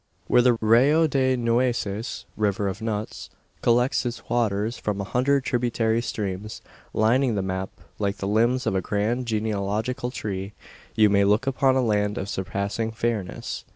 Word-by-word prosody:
Where 125 - +4
the 125 0 +5
Rio 130 +9 +5
de 130 -3 +2
Nueces 115 -2 -1
(River 100 -1 0
of 100 +3 -4
Nuts) 110 -1 -4 0.3
collects 120 +3 +2
its 120 -1 -5
waters 115 -1 0
from 105 -2 -2
a - - -1
hundred 130 +6 +1
tributary 120 -2 0
streams 105 -2 -4 0.3
lining 120 +2 +2
the 100 - -1
map 95 0 -3 0.3
like 100 -1 -1
the 100 - -3
limbs 120 +5 +2
of - - +1
a 95 - +1
grand 110 +6 -1
genealogical 110 +3 -1
tree 100 -4 -5 0.4
you 110 -1 +6
may 100 0 +4
look 105 +5 +2
upon 135 0 +2
a 130 - +2
land 105 -1 +1
of 100 - -4
surpassing 100 +4 -2
fairness. 110 -5 -3
110 Hz, 155 wpm, -24 LUFS, 100-120 Hz, 0.4 s, you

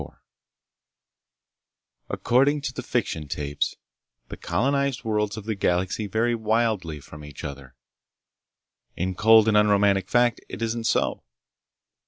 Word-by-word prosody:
IV - - -7 2.0
According 140 +4 +2
to 135 -2 -4
the 125 - -5
fiction 100 - -2
tapes, 70 0 -2 0.5
the - - -6
colonized 140 +8 -1
worlds 105 -1 -1
of 105 - -7
the 110 - -1
galaxy 95 +2 -1
vary 115 +4 0
wildly 110 -8 0
from 75 +1 -12
each 75 -1 -10
other. 70 -2 -8 1.2
In 95 +2 -2
cold 110 +3 +5
and 110 - +3
unromantic 100 -2 +3
fact, 120 -1 +2
it 95 - -7
isn't 115 0 -2
so. - - 0
105 Hz, 125 wpm, -25 LUFS, 90-120 Hz, 2.0 s, cold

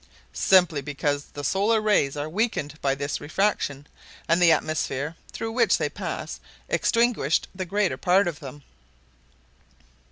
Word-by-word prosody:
"Simply 180 -6 +4
because 145 0 -2
the 145 - -9
solar 205 +9 +2
rays 200 -10 +2
are 145 +1 -3
weakened 155 - -2
by 135 -1 +1
this 140 +1 -3
refraction, 145 -3 -1 0.4
and 170 +2 +2
the 170 -2 +7
atmosphere 155 -1 -1 0.2
through 225 - -4
which 240 +2 +3
they - - -1
pass - - -5 0.3
extinguished 230 - +1
the 185 -1 -4
greater 200 +1 0
part 185 +1 +3
of 165 -4 -4
them!" 145 -1 -10
165 Hz, 135 wpm, -25 LUFS, 145-200 Hz, 0.4 s, the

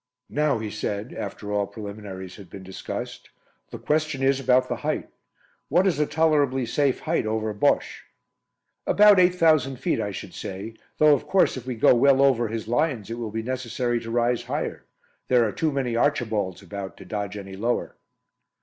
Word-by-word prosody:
"Now," 150 -3 +1
he 110 -1 -5
said, 105 +1 -4
after 105 0 -5
all 100 -1 0
preliminaries 100 -3 -8
had 100 - -12
been 95 - -10
discussed, 95 0 -7 0.4
"the - - -7
question 150 -3 -1
is 135 0 +3
about 130 -1 +3
the - - -3
height. - - -3 0.6
What 175 +6 +3
is 175 -7 +1
a 150 - +2
tolerably 145 -4 +2
safe 135 +3 0
height 160 -8 0
over 110 0 -1
'Bosche'?" 100 - +1 0.9
"About 205 -2 +6
8,000 160 -7 +4
feet, 125 -2 -1
I 105 - -2
should 95 - -7
say, 100 +4 -6 0.2
though 155 -1 +6
of 140 - -1
course 195 - +3
if 130 -1 -8
we 125 - -2
go 110 - +5
well 135 +2 +4
over 125 -4 +3
his 110 0 -5
lines 120 -4 0
it 115 - -4
will 115 -2 -3
be 110 +1 -4
necessary 120 -1 -2
to 115 - -8
rise 120 +1 +1
higher. - - -4 0.4
There 120 -3 +4
are - - -2
too 155 +9 -1
many 130 -4 -1
'Archibalds' 110 -8 0
about 95 +1 -7
to - - -12
dodge 105 -1 -4
any 95 -1 -8
lower." 120 +5 -2
120 Hz, 180 wpm, -25 LUFS, 105-140 Hz, 0.9 s, About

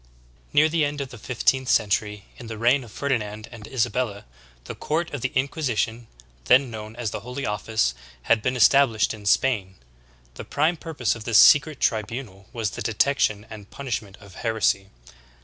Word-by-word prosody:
12. - - -31
Near 155 +2 +5
the 160 0 +1
end 145 0 -2
of 140 -2 -4
the 125 - -11
fifteenth 130 +2 0
century, 105 -2 +1
in 120 - -10
the 110 -1 -6
reign 125 +5 +3
of 115 - -13
Ferdinand 110 -5 -3
and 110 -3 -10
Isabella, 115 -4 -2 0.4
the - - -7
court 160 +1 -2
of 145 - -4
the 130 - -1
Inquisition, 120 -5 -1 0.4
then 130 - +4
known 110 0 -8
as 120 -3 -3
the - - -4
Holy 125 +5 -6
Office, 105 - 0 0.3
had 115 - +3
been 125 +3 -1
established 120 -2 +4
in 105 -2 -9
Spain. 100 -5 +1 0.6
The - - -8
prime 160 +4 0
purpose 150 -9 -2
of 115 -1 -9
this 115 -3 +3
secret 145 0 +6
tribunal 110 -3 -2
was 115 -3 -2
the - - -7
detection 110 -1 +1
and 105 -2 -10
punishment 110 -7 -5
of 100 -2 -15
heresy. 110 -4 +1
115 Hz, 175 wpm, -24 LUFS, 105-135 Hz, 0.6 s, secret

